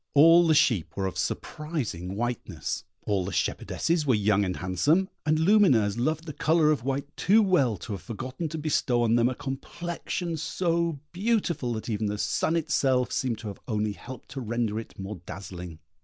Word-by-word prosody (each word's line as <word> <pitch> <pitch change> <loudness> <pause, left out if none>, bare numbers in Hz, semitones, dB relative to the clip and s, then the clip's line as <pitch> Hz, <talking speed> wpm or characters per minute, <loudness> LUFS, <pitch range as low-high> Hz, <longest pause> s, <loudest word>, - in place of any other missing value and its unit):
All 165 +4 +7
the 160 - +4
sheep 110 - +2
were 95 - 0
of 95 - -3
surprising 120 - -3
whiteness; 115 -7 -3 0.2
all 100 -3 +1
the 95 - -4
shepherdesses 165 - 0
were 130 -5 +3
young 105 -1 +2
and 90 -2 -1
handsome; 145 - +1 0.2
and 155 +1 +3
Lumineuse 155 - +4
loved 155 +6 0
the 155 - -6
colour 155 +1 +3
of 140 -6 0
white 140 +2 -3
too 215 +5 +4
well 140 - +2
to 100 - -8
have 100 -3 -4
forgotten 130 - -5
to 160 - -5
bestow 145 -5 +1
on 115 -1 +2
them 120 +1 +4
a 130 - -4
complexion 170 +5 -4
so 170 0 0
beautiful 180 - 0
that 110 - -5
even 110 -2 -1
the 105 0 -2
sun 160 +9 0
itself 135 -6 +1
seemed 125 -4 -1
to 110 0 -8
have 100 - -9
only 105 -2 0
helped 130 +3 -10
to 135 - -6
render 115 -2 -1
it 115 - -10
more 95 -2 -6
dazzling. 90 -4 -7
130 Hz, 185 wpm, -27 LUFS, 105-160 Hz, 0.2 s, All